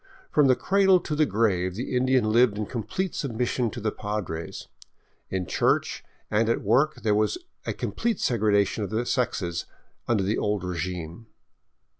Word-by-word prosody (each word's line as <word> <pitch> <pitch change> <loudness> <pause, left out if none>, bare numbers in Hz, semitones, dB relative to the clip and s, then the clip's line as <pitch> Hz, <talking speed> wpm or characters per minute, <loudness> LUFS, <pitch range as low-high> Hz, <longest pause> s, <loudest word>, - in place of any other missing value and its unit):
From 150 -2 +4
the 130 - +5
cradle 190 +2 +4
to 155 - -4
the 150 0 +3
grave 95 -5 +1
the 125 +3 -3
Indian 125 -3 +2
lived 115 -2 +4
in 105 - -2
complete 185 - -3
submission 125 -2 -1
to 120 - -7
the 110 -1 -1
Padres. 100 -7 -5 0.6
In 95 -1 -2
church - - 0 0.3
and 110 +2 +2
at 115 - 0
work 130 +9 +3
there 105 -2 +3
was 110 - +1 0.3
a - - 0
complete 230 -3 -2
segregation 105 -3 +2
of 100 - -3
the 110 +3 -1
sexes 95 -10 -1 0.4
under 110 -5 +2
the 100 +4 0
old 105 -2 -1
regime. 90 +2 -4
110 Hz, 160 wpm, -26 LUFS, 100-125 Hz, 0.6 s, the